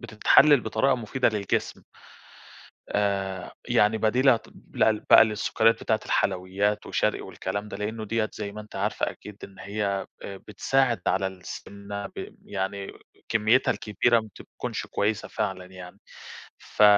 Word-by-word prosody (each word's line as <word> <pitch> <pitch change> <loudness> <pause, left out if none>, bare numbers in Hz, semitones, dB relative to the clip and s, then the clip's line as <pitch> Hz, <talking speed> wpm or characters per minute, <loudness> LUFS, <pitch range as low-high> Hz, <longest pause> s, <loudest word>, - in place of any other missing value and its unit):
بتتحلل 140 +5 +5
بطريقة 110 +5 +1
مفيدة 125 +2 0
للجسم. 105 -3 -2 1.1
آآ 95 -2 -1 0.2
يعني 105 +1 +3
بديلة 125 +3 +4
ت - - -18 0.2
لل 110 -1 +3
بقى 110 - +9
للسكريات 110 +1 +2
بتاعة - - +1
الحلويّات 95 +3 0
وشرقي - - 0
والكلام 100 +1 -5
ده، - - -7
لأنّه 110 +1 -4
دِيّة 110 0 -1
زي 100 -2 -5
ما 105 +1 -7
أنتِ 105 - -14
عارفة 105 +2 -1
أكيد 105 -1 -12
إن 95 -1 -11
هيّ، 100 +2 -3 0.4
آآ 100 -1 -6
بتساعد 120 +1 0
على 95 0 +2
السمنة، 100 +2 -7
ب - - -9
يعني 95 0 -4 0.4
كميتها 115 +3 +3
الكبيرة 115 +2 +2
ما 110 - -8
بتكونش - - -6
كويّسة 105 0 -1
فعلًا 95 -3 -3
يعني. 95 +1 -12 0.6
ف 105 - 0
105 Hz, 140 wpm, -26 LUFS, 100-110 Hz, 1.1 s, بقى